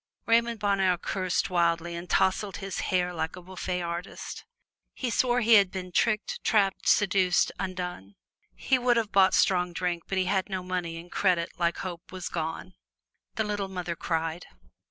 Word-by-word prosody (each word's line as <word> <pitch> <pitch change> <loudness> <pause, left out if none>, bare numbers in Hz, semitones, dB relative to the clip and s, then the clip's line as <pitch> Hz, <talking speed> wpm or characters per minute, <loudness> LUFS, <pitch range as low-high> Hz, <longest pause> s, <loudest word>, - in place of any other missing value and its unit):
Raymond 230 0 +2
Bonheur 195 -3 +2
cursed 185 +1 -1
wildly 170 -1 +1
and 170 +1 -7
tousled 190 +1 +1
his 195 -1 -5
hair 180 -1 +1
like 160 -1 -3
a - - -9
bouffe 180 0 -4
artist. 170 +2 -6 0.5
He 250 -3 -2
swore 245 +1 +2
he 230 0 +4
had 200 -3 +7
been 185 -1 -6
tricked, 230 - 0
trapped, 200 -3 +2
seduced, 190 -3 +3
undone. 180 - -5 0.4
He 260 -1 +1
would 245 -1 +3
have 220 -3 0
bought 190 -1 +5
strong 180 -2 +2
drink, 175 -1 -1
but 195 - -2
he 185 - +2
had 190 +1 0
no 190 -2 -3
money, 180 -2 -3
and 170 +1 -11
credit, 180 -4 +1
like 170 -1 +1
hope, 175 -2 -7
was 185 -1 -5
gone. 160 -1 -4 0.6
The 220 - +1
little 205 -2 -2
mother 180 -2 -4
cried. 165 0 -2
185 Hz, 170 wpm, -28 LUFS, 175-200 Hz, 0.6 s, had